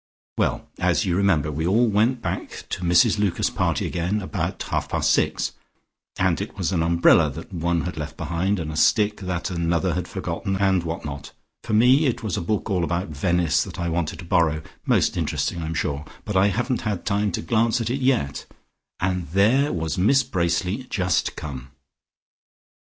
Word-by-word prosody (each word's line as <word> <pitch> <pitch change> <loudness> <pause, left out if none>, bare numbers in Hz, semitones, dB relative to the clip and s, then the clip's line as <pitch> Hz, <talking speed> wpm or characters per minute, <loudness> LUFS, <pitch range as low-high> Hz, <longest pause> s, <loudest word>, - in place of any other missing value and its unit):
Well - - -1
as - - +2
you 90 - 0
may - - +1
remember, 85 -7 +2
we 80 +3 -2
all 110 +6 +4
went 115 +3 +1
back - - -4
to - - -3
Mrs 85 +4 +4
Lucas's 100 -4 +1
party - - 0
again 90 +5 -1
about 95 - -3
half - - -2
past - - +1
six, - - +1 0.7
and - - +1
it - - -6
was - - -1
an 90 -4 +1
umbrella 85 -1 +4
that 80 +6 -9
one 85 -1 0
had 85 0 -5
left 75 +1 -6
behind, 95 +4 -1
and 80 -2 -4
a - - -6
stick 105 +6 +3
that 90 -1 -3
another 85 +1 0
had 90 +1 -3
forgotten, 95 +1 -3
and 95 -2 +2
what 85 -1 -5
not, 70 -2 -7 0.3
for - - -4
me 130 +7 +5
it 120 - -2
was 105 -5 -2
a 105 - -2
book 100 +4 -1
all 95 -5 0
about 85 +2 -1
Venice, 85 +2 +1
that - - -9
I 85 -1 -1
wanted 80 -2 -2
to 85 - -9
borrow, 80 -2 +2 0.2
most - - +2
interesting 85 - -1
I 80 - -4
am 80 - -3
sure, 75 -1 -2 0.2
but 105 - -4
I 95 +2 +5
haven't 120 +5 -1
had 105 -5 -3
time 100 0 +1
to - - -2
glance 115 +6 +2
at 115 0 -2
it 135 +2 -2
yet, 125 - 0 0.5
and 90 -1 -1
there 110 - +3
was 80 +1 -2
Miss 135 +9 +4
Bracely 95 +2 -1
just 90 -3 0
come!" 70 -2 -7
90 Hz, 195 wpm, -23 LUFS, 85-105 Hz, 0.7 s, me